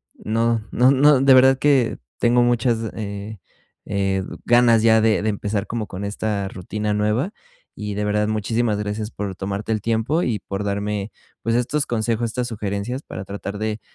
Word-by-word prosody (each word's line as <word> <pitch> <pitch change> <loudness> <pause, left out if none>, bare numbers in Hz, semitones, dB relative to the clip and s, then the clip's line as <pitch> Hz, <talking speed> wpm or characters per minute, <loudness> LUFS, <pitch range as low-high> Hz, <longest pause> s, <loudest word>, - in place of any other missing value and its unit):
no 115 0 0
no 125 +1 +4
no 140 0 +5
de 135 -1 +6
verdad 130 +1 +6
que, 135 -5 +2 0.2
tengo 120 +1 +4
muchas, 120 -1 +2 0.2
eh 100 0 -6 0.5
eh, 95 -1 0 0.2
ganas 120 -2 +5
ya 110 -1 +5
de 110 -1 +3
de 110 - 0
empezar 105 0 -2
como 115 -2 -3
con 95 +2 -7
esta 100 -1 -2
rutina 105 +3 -4
nueva 105 - 0 0.4
y, 105 -1 -5
de 105 +1 -2
verdad, 105 0 +1
muchísimas 110 +1 0
gracias 105 +1 -3
por 100 -2 -5
tomarte 100 +3 -4
el 110 - 0
tiempo 115 - 0
y 110 -4 -1
por 100 +2 -5
darme, 100 0 -2 0.3
pues, 115 - 0
estos 130 +5 0
consejos, 115 0 -1
estas 125 +1 -2
sugerencias 105 +4 -4
para 95 - -7
tratar 100 +1 -6
de 110 0 -2
110 Hz, 170 wpm, -22 LUFS, 105-120 Hz, 0.5 s, de